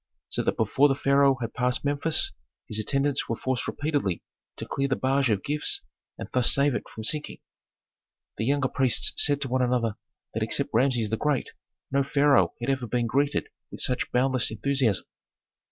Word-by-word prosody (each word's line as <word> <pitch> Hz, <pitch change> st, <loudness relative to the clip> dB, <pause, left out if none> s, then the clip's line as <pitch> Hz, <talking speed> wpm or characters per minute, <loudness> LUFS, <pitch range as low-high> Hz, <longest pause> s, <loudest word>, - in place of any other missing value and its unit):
So -, -, -1 dB
that -, -, -1 dB
before 145 Hz, +2 st, +3 dB
the 135 Hz, -, 0 dB
pharaoh 140 Hz, -1 st, +3 dB
had 115 Hz, -1 st, -4 dB
passed 125 Hz, +2 st, 0 dB
Memphis, 145 Hz, +3 st, +3 dB, 0.4 s
his 110 Hz, -, -2 dB
attendants 135 Hz, +6 st, -1 dB
were 115 Hz, -, 0 dB
forced 130 Hz, +1 st, -2 dB
repeatedly 145 Hz, -, -2 dB, 0.3 s
to -, -, -7 dB
clear 140 Hz, 0 st, -1 dB
the 135 Hz, -, 0 dB
barge 135 Hz, 0 st, +1 dB
of 105 Hz, -3 st, 0 dB
gifts 150 Hz, +1 st, +1 dB, 0.3 s
and -, -, -7 dB
thus 125 Hz, -2 st, +5 dB
save 140 Hz, 0 st, +3 dB
it -, -, -5 dB
from 110 Hz, -, -9 dB
sinking. 150 Hz, +6 st, 0 dB, 1.0 s
The 110 Hz, -, -2 dB
younger 140 Hz, +1 st, +1 dB
priests 130 Hz, -3 st, +2 dB
said 145 Hz, -1 st, +4 dB
to 135 Hz, -, -1 dB
one 130 Hz, +1 st, 0 dB
another 120 Hz, -3 st, 0 dB, 0.4 s
that -, -, -3 dB
except -, -, 0 dB
Rameses 120 Hz, -3 st, +1 dB
the 110 Hz, -, 0 dB
Great 150 Hz, -1 st, -1 dB, 0.4 s
no 140 Hz, +1 st, +2 dB
pharaoh 140 Hz, +1 st, +2 dB
had 120 Hz, +3 st, -1 dB
ever 130 Hz, -3 st, -2 dB
been 120 Hz, +1 st, -1 dB
greeted 140 Hz, +5 st, 0 dB, 0.2 s
with -, -, -6 dB
such 125 Hz, -1 st, 0 dB
boundless 130 Hz, 0 st, +1 dB
enthusiasm. 115 Hz, -2 st, 0 dB
130 Hz, 180 wpm, -26 LUFS, 120-140 Hz, 1.0 s, thus